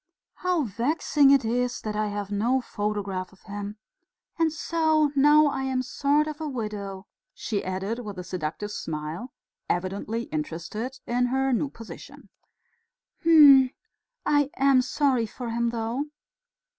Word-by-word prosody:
How 360 Hz, -4 st, +1 dB
vexing 270 Hz, -, +2 dB
it 275 Hz, -4 st, +5 dB
is 245 Hz, +2 st, 0 dB
that 215 Hz, -1 st, -4 dB
I 215 Hz, 0 st, 0 dB
have 205 Hz, -1 st, -4 dB
no 235 Hz, +6 st, +2 dB
photograph 205 Hz, -5 st, -3 dB
of 190 Hz, -, -22 dB
him.... 205 Hz, 0 st, -6 dB, 0.6 s
And 325 Hz, -1 st, +3 dB
so 315 Hz, -1 st, +1 dB
now 295 Hz, +2 st, +6 dB
I 275 Hz, -2 st, 0 dB
am 260 Hz, -1 st, 0 dB
a -, -, -5 dB
sort 285 Hz, +4 st, +1 dB
of 305 Hz, 0 st, -6 dB
widow," 210 Hz, -9 st, -5 dB, 0.3 s
she 205 Hz, -3 st, -3 dB
added, 190 Hz, +5 st, -3 dB
with 210 Hz, -5 st, -7 dB
a 180 Hz, -, -5 dB
seductive 180 Hz, +3 st, -4 dB
smile, 160 Hz, +8 st, -5 dB, 0.4 s
evidently 200 Hz, +6 st, -2 dB
interested 170 Hz, -, -4 dB
in 245 Hz, +1 st, +1 dB
her 265 Hz, +1 st, +1 dB
new 275 Hz, +4 st, 0 dB
position. 230 Hz, -4 st, -12 dB, 0.9 s
"Hm!... 290 Hz, -6 st, +8 dB, 0.6 s
I 290 Hz, -1 st, +3 dB
am 270 Hz, -1 st, +5 dB
sorry 255 Hz, -3 st, +1 dB
for 235 Hz, +2 st, -6 dB
him, 235 Hz, 0 st, 0 dB
though." 230 Hz, +4 st, -2 dB
235 Hz, 140 wpm, -26 LUFS, 205-275 Hz, 0.9 s, Hm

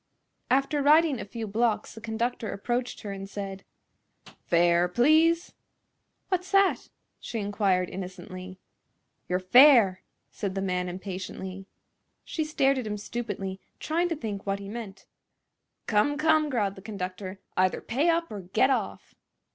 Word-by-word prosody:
After 275 Hz, +3 st, +2 dB
riding 300 Hz, -1 st, +5 dB
a -, -, -5 dB
few 225 Hz, +3 st, -6 dB
blocks 220 Hz, +2 st, 0 dB
the 225 Hz, -, -11 dB
conductor 230 Hz, 0 st, -2 dB
approached 240 Hz, +5 st, -3 dB
her 205 Hz, -, -6 dB
and 195 Hz, 0 st, -7 dB
said: 195 Hz, -1 st, -6 dB, 0.8 s
"Fare, 170 Hz, +1 st, +4 dB
please!" 315 Hz, -, +3 dB, 0.8 s
"What's 370 Hz, -1 st, -1 dB
that?" 395 Hz, -1 st, +3 dB, 0.3 s
she 235 Hz, -, -5 dB
inquired, 200 Hz, -3 st, +1 dB
innocently. 185 Hz, 0 st, -8 dB, 0.7 s
"Your 180 Hz, -, +2 dB
fare!" 220 Hz, 0 st, +6 dB, 0.3 s
said 200 Hz, -2 st, -4 dB
the 195 Hz, -, -1 dB
man, 180 Hz, -1 st, -1 dB
impatiently. 190 Hz, +1 st, -6 dB, 0.6 s
She 315 Hz, -, -2 dB
stared 275 Hz, -3 st, +2 dB
at 240 Hz, -, -4 dB
him 210 Hz, 0 st, -3 dB
stupidly, 200 Hz, -3 st, -5 dB, 0.2 s
trying 340 Hz, +3 st, 0 dB
to 330 Hz, -, -1 dB
think 210 Hz, -8 st, -5 dB
what 195 Hz, 0 st, 0 dB
he 200 Hz, 0 st, -8 dB
meant. 210 Hz, -3 st, -8 dB, 0.8 s
"Come, 220 Hz, +7 st, +2 dB
come!" 310 Hz, -1 st, +3 dB
growled 210 Hz, -7 st, 0 dB
the 190 Hz, -, -12 dB
conductor, 190 Hz, -1 st, -6 dB, 0.2 s
"either 185 Hz, 0 st, +2 dB
pay 280 Hz, +9 st, 0 dB
up 335 Hz, 0 st, +1 dB
or 210 Hz, -, -5 dB
get 215 Hz, +9 st, +2 dB
off!" -, -, -3 dB
210 Hz, 140 wpm, -27 LUFS, 190-270 Hz, 0.8 s, fare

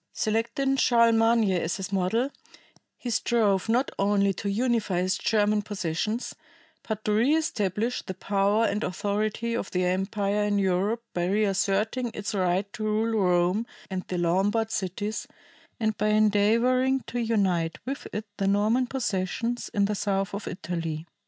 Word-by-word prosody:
Selecting 235 Hz, +5 st, 0 dB
Charlemagne 230 Hz, -3 st, +4 dB
as 175 Hz, -2 st, 0 dB
his 190 Hz, 0 st, -5 dB
model, 225 Hz, +8 st, +1 dB, 0.7 s
he 245 Hz, -, -5 dB
strove 215 Hz, -4 st, +1 dB
not 250 Hz, +4 st, +2 dB
only 200 Hz, 0 st, +2 dB
to 200 Hz, +2 st, -4 dB
unify 220 Hz, -4 st, 0 dB
his 185 Hz, +1 st, +1 dB
German 210 Hz, -1 st, +2 dB
possessions, 205 Hz, +3 st, -3 dB, 0.5 s
but 215 Hz, -1 st, -5 dB
to 210 Hz, -, +2 dB
re 240 Hz, +8 st, +3 dB
establish 225 Hz, -, -1 dB
the 185 Hz, -, -7 dB
power 200 Hz, +4 st, +1 dB
and 210 Hz, 0 st, -1 dB
authority 210 Hz, +5 st, -1 dB
of 215 Hz, -, -3 dB
the 180 Hz, 0 st, 0 dB
empire 200 Hz, +3 st, 0 dB
in 205 Hz, 0 st, +1 dB
Europe 200 Hz, +4 st, +1 dB
by 175 Hz, -1 st, 0 dB
reasserting 205 Hz, +4 st, +1 dB
its 205 Hz, 0 st, -4 dB
right 190 Hz, +1 st, 0 dB
to 220 Hz, -, -5 dB
rule 220 Hz, +1 st, 0 dB
Rome 180 Hz, +5 st, +2 dB, 0.2 s
and 185 Hz, -1 st, -2 dB
the 180 Hz, -, -3 dB
Lombard 195 Hz, +6 st, +1 dB
cities, 205 Hz, +7 st, -3 dB, 0.5 s
and 220 Hz, -1 st, 0 dB
by 210 Hz, -, +2 dB
endeavoring 230 Hz, +5 st, +3 dB
to 245 Hz, -, -5 dB
unite 190 Hz, -8 st, +1 dB
with 275 Hz, +2 st, -4 dB
it 210 Hz, +1 st, -4 dB
the 195 Hz, -, 0 dB
Norman 215 Hz, +6 st, +2 dB
possessions 235 Hz, -1 st, -2 dB
in 200 Hz, -1 st, +2 dB
the 210 Hz, -, -1 dB
south 195 Hz, -1 st, -1 dB
of 200 Hz, +1 st, -5 dB
Italy. 165 Hz, -2 st, -4 dB
210 Hz, 150 wpm, -26 LUFS, 190-230 Hz, 0.7 s, Charlemagne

